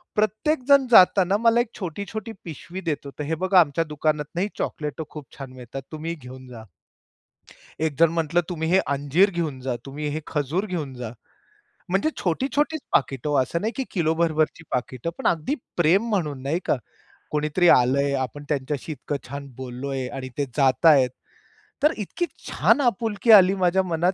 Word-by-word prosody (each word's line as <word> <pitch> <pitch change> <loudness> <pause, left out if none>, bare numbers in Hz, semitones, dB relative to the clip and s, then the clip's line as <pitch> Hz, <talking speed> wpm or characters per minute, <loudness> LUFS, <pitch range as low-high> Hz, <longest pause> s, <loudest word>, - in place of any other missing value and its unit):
प्रत्येक 220 +8 0
जण 280 -1 +6
जाताना 190 -1 +6
मला 230 +1 +3
एक 240 - -4
छोटी-छोटी 200 +5 -5
पिशवी 170 +3 -7
देतं 155 -4 -3
होता, 140 - -9
"तर - - -6
हे 160 - +1
बघा, 185 -1 +5
आमच्या 160 0 +3
दुकानातनही 155 +3 -1
चॉकलेटं 150 +1 -3
खूप 150 -2 -9
छान 135 -2 -8
मिळतात. 125 +2 -8
तुम्ही 165 +2 -4
घेऊन 130 -2 -12
जा". 120 -3 -10 1.2
एक 160 -2 0
जण 165 -1 +6
म्हटलं, 165 +1 +1
"तुम्ही 160 -2 -3
हे 190 - +5 0.2
अंजीर 145 +8 +3
घेऊन 160 -7 -3
जा. 130 -1 -2
तुम्ही 145 +2 -6
हे 155 - -2
खजूर 150 +6 -1
घेऊन 160 -8 -4
जा". 120 -2 -6 0.8
म्हणजे 195 - +2
छोटी-छोटीच 280 - 0
पाकीटं 135 +1 0
ओ - - 0
असं 170 +6 -2
नाही 220 - -1
की 270 - -1
किलो 160 -4 +1
भरभरची 160 -1 0
पाकीटं. 125 +4 -2
पण - - -1
अगदी 170 - 0 0.2
प्रेम 185 +7 +3
म्हणून 150 -10 -1
नाही 155 +6 0
का? - - +1 0.5
कोणीतरी 150 +4 +2
आलं 125 +3 +5
आहे. 140 0 +1
आपण 135 +2 -3
त्यांच्याशी 145 +1 -2
इतकं 145 +1 -4
छान 140 0 -6
बोललो 130 +1 -6
आहे 130 -2 -2
आणि 130 0 -6
ते 145 - +2
जात 135 +3 +3
आहेत. 135 -5 +6 0.7
तर 300 - +6
इतकी 220 - -3 0.2
छान 290 - +3
आपुलकी 225 -2 +1
आली 195 -2 +8
माझ्या 190 0 +2
मनात 175 +1 0
160 Hz, 175 wpm, -24 LUFS, 140-190 Hz, 1.2 s, आली